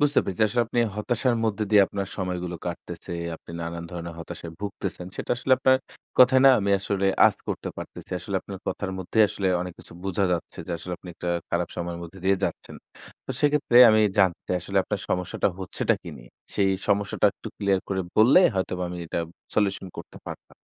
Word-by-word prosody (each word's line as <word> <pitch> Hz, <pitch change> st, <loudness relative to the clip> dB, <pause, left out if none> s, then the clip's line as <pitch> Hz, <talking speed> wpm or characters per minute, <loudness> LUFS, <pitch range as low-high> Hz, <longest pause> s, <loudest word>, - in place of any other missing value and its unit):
বুঝতে 145 Hz, 0 st, +4 dB
পেরেছি। 95 Hz, +2 st, -1 dB
আসলে 120 Hz, +2 st, +2 dB
আপনি 120 Hz, +1 st, -2 dB, 0.2 s
হতাশার 120 Hz, +3 st, +1 dB
মধ্যে 110 Hz, -1 st, 0 dB
দিয়ে 105 Hz, -2 st, +7 dB
আপনার 100 Hz, -1 st, -4 dB
সময়গুলো 90 Hz, -2 st, -3 dB
কাটতেছে, 85 Hz, +1 st, -6 dB, 0.2 s
আপনি -, -, -15 dB
নানান 85 Hz, 0 st, -5 dB
ধরনের 85 Hz, -1 st, -6 dB
হতাশায় 85 Hz, 0 st, -8 dB
ভুগতেছেন। 100 Hz, -3 st, -5 dB
সেটা -, -, -5 dB
আসলে 120 Hz, +2 st, +1 dB
আপনার 130 Hz, 0 st, +5 dB, 0.4 s
কথায় 130 Hz, +1 st, +7 dB
না -, -, +10 dB
আমি 100 Hz, 0 st, 0 dB
আসলে 100 Hz, 0 st, 0 dB, 0.2 s
আঁচ -, -, +1 dB
করতে -, -, -3 dB
পারতেছি। -, -, -9 dB
আসলে 100 Hz, +2 st, -3 dB
আপনার 100 Hz, -1 st, -8 dB
কথার 100 Hz, -2 st, -2 dB
মধ্যেই 110 Hz, +4 st, +3 dB
আসলে 95 Hz, -1 st, -1 dB
অনেক 90 Hz, 0 st, -4 dB
কিছু -, -, -13 dB
বোঝা 95 Hz, 0 st, 0 dB
যাচ্ছে 85 Hz, -, -4 dB
যে -, -, -4 dB
আসলে 90 Hz, +2 st, -6 dB
আপনি 90 Hz, -, -12 dB
একটা 90 Hz, -, -5 dB, 0.2 s
খারাপ 85 Hz, 0 st, 0 dB
সময়ের 85 Hz, -1 st, -4 dB
মধ্যে 85 Hz, +3 st, -10 dB
দিয়ে 95 Hz, +1 st, +4 dB
যাচ্ছেন। -, -, -5 dB, 0.5 s
তো -, -, -7 dB
সেক্ষেত্রে 145 Hz, -4 st, +2 dB
আমি 110 Hz, -, +5 dB, 0.2 s
জানতে 95 Hz, -3 st, +4 dB
চাই, 90 Hz, -, +1 dB
আসলে 95 Hz, +1 st, 0 dB
আপনার 105 Hz, -2 st, -3 dB
সমস্যাটা 90 Hz, +2 st, 0 dB
হচ্ছেটা 95 Hz, -, 0 dB
কি -, -, -9 dB
নিয়ে? -, -, -15 dB, 0.2 s
সেই 95 Hz, -1 st, +3 dB, 0.2 s
সমস্যাটা 100 Hz, 0 st, +2 dB
একটু -, -, -9 dB
ক্লিয়ার 100 Hz, -1 st, +2 dB
করে 95 Hz, -1 st, 0 dB, 0.2 s
বললে 120 Hz, +11 st, +7 dB
হয়তোবা 95 Hz, -1 st, -1 dB
আমি 90 Hz, 0 st, -6 dB
এটা 85 Hz, -, -3 dB, 0.4 s
সলিউশন 100 Hz, -2 st, +1 dB
করতে -, -, -9 dB
পারতাম। -, -, -9 dB
95 Hz, 190 wpm, -25 LUFS, 90-105 Hz, 0.5 s, না